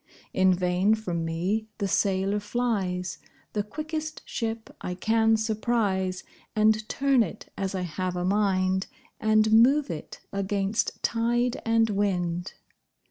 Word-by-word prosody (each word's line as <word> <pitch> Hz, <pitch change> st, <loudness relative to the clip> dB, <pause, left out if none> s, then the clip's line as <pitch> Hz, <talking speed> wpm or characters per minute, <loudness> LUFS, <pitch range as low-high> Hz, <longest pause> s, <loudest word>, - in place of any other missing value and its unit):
In 190 Hz, 0 st, +4 dB
vain 180 Hz, +3 st, +2 dB
from 175 Hz, -6 st, -3 dB
me 180 Hz, +7 st, -1 dB
the 200 Hz, -, -1 dB
sailor 195 Hz, +2 st, +1 dB
flies, 205 Hz, -5 st, -2 dB, 0.3 s
The 210 Hz, -, +1 dB
quickest 310 Hz, +7 st, -5 dB
ship 225 Hz, -1 st, -4 dB
I 180 Hz, -, -4 dB
can 225 Hz, +3 st, +3 dB
surprise, 215 Hz, -4 st, 0 dB, 0.3 s
And 215 Hz, 0 st, +3 dB
turn 275 Hz, -2 st, +3 dB
it 215 Hz, -1 st, -4 dB
as 195 Hz, 0 st, -3 dB
I 185 Hz, -, -1 dB
have 180 Hz, +2 st, -3 dB
a 180 Hz, 0 st, -1 dB
mind, 190 Hz, -1 st, +1 dB, 0.3 s
And 215 Hz, 0 st, +3 dB
move 265 Hz, +2 st, +5 dB
it 155 Hz, -, -7 dB
against 200 Hz, +1 st, -1 dB
tide 240 Hz, +1 st, +1 dB
and 225 Hz, -1 st, +3 dB
wind. 180 Hz, -3 st, -1 dB
205 Hz, 130 wpm, -27 LUFS, 185-225 Hz, 0.3 s, move